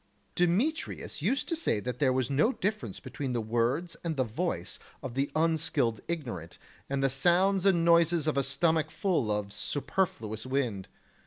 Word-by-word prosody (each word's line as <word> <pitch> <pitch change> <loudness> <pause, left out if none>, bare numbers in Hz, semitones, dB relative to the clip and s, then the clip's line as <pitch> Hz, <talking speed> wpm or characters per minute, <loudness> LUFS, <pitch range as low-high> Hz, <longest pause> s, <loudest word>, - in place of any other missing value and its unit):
Demetrius 200 - 0
used 275 - 0
to 335 - 0
say 310 - +1
that 125 +2 -4
there 135 -3 +3
was 130 -2 +1
no 145 - +3
difference 185 - -3
between 135 -3 -4
the 120 - 0
words 120 +10 0
and 165 -3 -2
the 130 - +3
voice 145 +10 -3 0.2
of 130 -3 -5
the 135 +2 0
unskilled 155 -8 +1
ignorant 115 - -5 0.3
and 135 0 0
the - - +5
sounds 180 +7 +3
and 170 -4 +3
noises 170 -1 +4
of 155 - +1
a 140 - +3
stomach 155 +3 +1
full 160 - 0
of 105 -1 -2
superfluous 115 - -2
wind. 125 -8 -1
145 Hz, 165 wpm, -29 LUFS, 120-170 Hz, 0.3 s, the